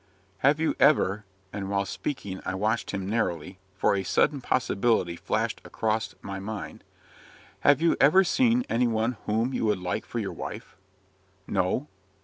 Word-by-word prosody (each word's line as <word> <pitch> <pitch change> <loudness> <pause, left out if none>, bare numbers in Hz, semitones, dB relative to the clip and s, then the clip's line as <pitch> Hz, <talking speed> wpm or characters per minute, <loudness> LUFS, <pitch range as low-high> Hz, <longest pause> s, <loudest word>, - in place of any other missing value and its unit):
"Have 140 +6 +3
you 160 - +1
ever 110 -8 +3
" 95 -1 -37
and, 100 -1 -4
while 100 0 0
speaking, 100 -3 -5
I - - -3
watched 105 +3 0
him 95 -2 -3
narrowly, 95 -4 -2 0.2
for 90 - +2
a 100 - 0
sudden 140 +8 +1
possibility 115 -7 +1
flashed - - -2
across 110 0 -2
my 95 0 -5
mind 105 +1 -6 0.8
"Have 145 +3 +4
you 170 - +4
ever 160 +8 +7
seen 245 +5 +2
any 120 +1 +2
one 115 +1 0
whom 115 +5 +1
you 115 - 0
would 105 -2 +2
like 90 0 -3
for - - -5
your - - -2
wife?" - - -7 0.7
"No." 95 +9 0
110 Hz, 160 wpm, -27 LUFS, 95-135 Hz, 0.8 s, ever